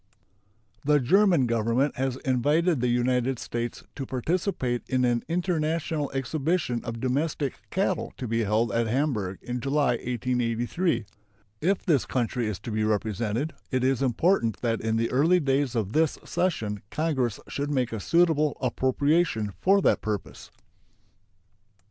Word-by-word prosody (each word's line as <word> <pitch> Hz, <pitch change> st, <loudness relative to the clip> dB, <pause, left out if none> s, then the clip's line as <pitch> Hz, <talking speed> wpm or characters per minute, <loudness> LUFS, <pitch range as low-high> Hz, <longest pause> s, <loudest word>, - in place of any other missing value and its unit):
The 150 Hz, +1 st, +4 dB
German 175 Hz, -, +4 dB
Government 115 Hz, +4 st, +1 dB
has 130 Hz, -1 st, -1 dB
invited 145 Hz, +4 st, +2 dB
the 125 Hz, -, +2 dB
United 125 Hz, +1 st, +1 dB
States 120 Hz, +1 st, -4 dB
to 135 Hz, -2 st, -5 dB
participate 130 Hz, -, -1 dB
in 130 Hz, -1 st, +2 dB
an 120 Hz, -1 st, +1 dB
international 165 Hz, -3 st, -1 dB
exhibition 135 Hz, -1 st, -1 dB
of 115 Hz, -1 st, -5 dB
domestic 140 Hz, +2 st, -1 dB
cattle -, -, -1 dB
to 125 Hz, -, -4 dB
be 115 Hz, +1 st, 0 dB
held 110 Hz, +3 st, +1 dB
at 115 Hz, 0 st, +1 dB
Hamburg 110 Hz, -7 st, -1 dB
in 125 Hz, 0 st, -3 dB
July, 140 Hz, -2 st, +1 dB
1883. 120 Hz, -, -1 dB, 0.6 s
If 190 Hz, +4 st, +1 dB
this 155 Hz, -, +2 dB
country 120 Hz, -2 st, -1 dB
is 105 Hz, -3 st, -3 dB
to 115 Hz, -, -6 dB
be 110 Hz, 0 st, 0 dB
represented, 110 Hz, -, -1 dB, 0.2 s
it 130 Hz, -1 st, 0 dB
is 130 Hz, 0 st, +2 dB
important 130 Hz, -, +2 dB
that 115 Hz, -2 st, 0 dB
in 110 Hz, 0 st, 0 dB
the 115 Hz, +1 st, 0 dB
early 160 Hz, +8 st, +4 dB
days 135 Hz, -3 st, 0 dB
of 110 Hz, -2 st, -1 dB
this 160 Hz, 0 st, +2 dB
session 110 Hz, -, -1 dB
Congress 130 Hz, -8 st, -1 dB
should 145 Hz, +1 st, -3 dB
make 130 Hz, -5 st, 0 dB
a 110 Hz, -, -3 dB
suitable 155 Hz, -, +2 dB
appropriation 130 Hz, -2 st, +1 dB
for 195 Hz, +1 st, +4 dB
that -, -, +3 dB
purpose. 105 Hz, -2 st, -5 dB
130 Hz, 140 wpm, -26 LUFS, 115-150 Hz, 0.6 s, The